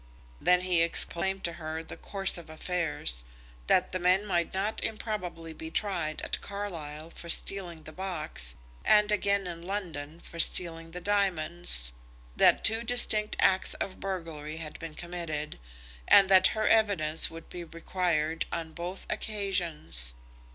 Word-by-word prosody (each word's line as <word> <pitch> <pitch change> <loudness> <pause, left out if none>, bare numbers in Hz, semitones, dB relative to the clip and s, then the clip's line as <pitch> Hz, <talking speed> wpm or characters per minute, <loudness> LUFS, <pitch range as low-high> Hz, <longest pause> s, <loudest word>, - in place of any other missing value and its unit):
Then 180 0 +4
he 180 -2 +2
explained 190 +3 +3
to 170 - -2
her 160 +1 -5
the - - -9
course 195 -1 +1
of 165 - -13
affairs, 155 - -2 0.4
that 185 - +3
the 185 - -2
men 185 +3 +2
might 175 -4 -1
not 200 +3 -2
improbably 180 -7 -5
be 160 0 -8
tried 170 -5 -3
at - - -2
Carlisle 165 -6 -6
for 170 - -9
stealing 175 -3 +4
the - - -10
box, 155 - -3 0.3
and 210 0 +4
again 200 -1 +1
in 170 -2 -7
London 170 -5 -6
for 170 - -12
stealing 165 -1 +3
the 180 +2 -8
diamonds, 175 - 0 0.4
that - - +4
two 225 +1 +3
distinct 220 -3 +2
acts 190 0 +3
of 185 - -5
burglary 165 -5 -5
had 155 -2 -8
been 165 -2 -8
committed, 170 - -5 0.5
and 195 -1 +7
that 190 -1 +7
her 215 - +1
evidence 195 -8 +3
would 165 0 -11
be 175 - -8
required 165 -1 -2
on 160 -1 -5
both 180 +3 -6
occasions. 170 - +2
175 Hz, 145 wpm, -28 LUFS, 160-195 Hz, 0.5 s, and